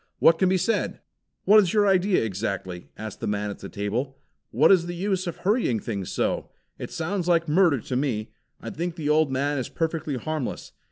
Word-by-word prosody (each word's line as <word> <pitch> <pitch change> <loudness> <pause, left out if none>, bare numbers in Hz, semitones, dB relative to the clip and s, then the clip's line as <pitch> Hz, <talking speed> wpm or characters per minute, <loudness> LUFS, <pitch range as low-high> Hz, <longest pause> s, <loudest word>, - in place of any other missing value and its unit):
What 165 0 +5
can 190 - +3
be 190 - +3
said?" 185 +6 -1 0.5
"What 215 +2 +7
is 190 -5 +2
your 210 -1 +4
idea 195 - +3
exactly?" 95 -3 -4
asked 110 -1 -7
the - - -3
man 105 0 -1
at - - -9
the 100 - -8
table. 120 +7 -3 0.3
"What - - +4
is 175 -3 +4
the 175 - -4
use 190 0 -1
of 170 - -4
hurrying 195 - +1
things 100 -4 -4
so? - - -1 0.3
It - - -5
sounds 180 +2 -3
like 170 -1 +3
murder 160 -3 +4
to 125 - -4
me. 125 -5 -1 0.3
I - - -7
think 170 +1 -4
the 155 -4 -3
old 155 -2 +3
man 140 +2 0
is 125 - -4
perfectly 160 -3 -2
harmless. 155 +1 -4
155 Hz, 205 wpm, -25 LUFS, 115-180 Hz, 0.5 s, What